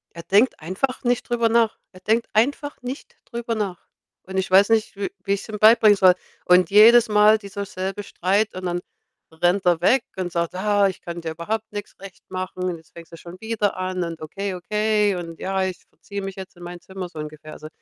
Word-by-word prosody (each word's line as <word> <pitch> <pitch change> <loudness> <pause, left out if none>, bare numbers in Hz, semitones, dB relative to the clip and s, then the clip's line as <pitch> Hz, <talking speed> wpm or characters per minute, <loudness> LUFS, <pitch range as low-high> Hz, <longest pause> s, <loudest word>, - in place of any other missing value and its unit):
Er 170 - -8
denkt 210 +9 +3
einfach 190 - -3
nicht 245 0 0
drüber 235 -1 +2
nach. 230 -1 +2 0.2
Er 185 - -15
denkt 225 +4 +1
einfach 285 +6 0
nicht 255 +3 -7
drüber 235 -1 -4
nach. 200 -5 -4 0.4
Und 190 +1 -6
ich 190 0 -1
weiß 195 +3 +6
nicht, 225 -2 +1
w 200 - -2
wie 200 - 0
ich's 200 - -4
ihm 215 - -4
beibringen 215 0 +6
soll. 185 -2 +5 0.3
Und 180 -1 +5
jedes 225 +3 +7
Mal 210 +1 +5
dieser 200 -1 -6
selbe 195 +2 -5
Streit, 200 +4 0
und 185 0 -6
dann 175 0 -2 0.5
rennt 175 +4 +1
er 175 -2 +3
weg 245 +7 +4
und 180 -2 -3
sagt: 170 0 -2
„Ah, 205 +1 +2
ich 190 - -9
kann 170 0 -7
dir 160 -1 -4
überhaupt 210 +8 -4
nix 205 -1 -7
recht 195 -1 -12
machen. 185 0 -5
Und 180 -2 -2
jetzt 160 -1 -21
fängst 170 0 -13
du - - -9
schon 175 +2 -12
wieder 220 -3 -1
an.“, 185 -1 -2
und 165 -2 -6
„Okay, 195 +5 -4
okay“, 210 +2 +1
und 165 -2 -7
„Ja, 190 0 -1
ich 185 -1 -3
verziehe 200 0 -8
mich 195 -1 -6
jetzt 190 -1 -9
in 175 - -12
mein 175 0 -8
Zimmer“ 190 -1 -7
so 165 -3 -11
ungefähr. 155 0 -8
Also, 155 - -10
195 Hz, 220 wpm, -22 LUFS, 180-215 Hz, 0.5 s, jedes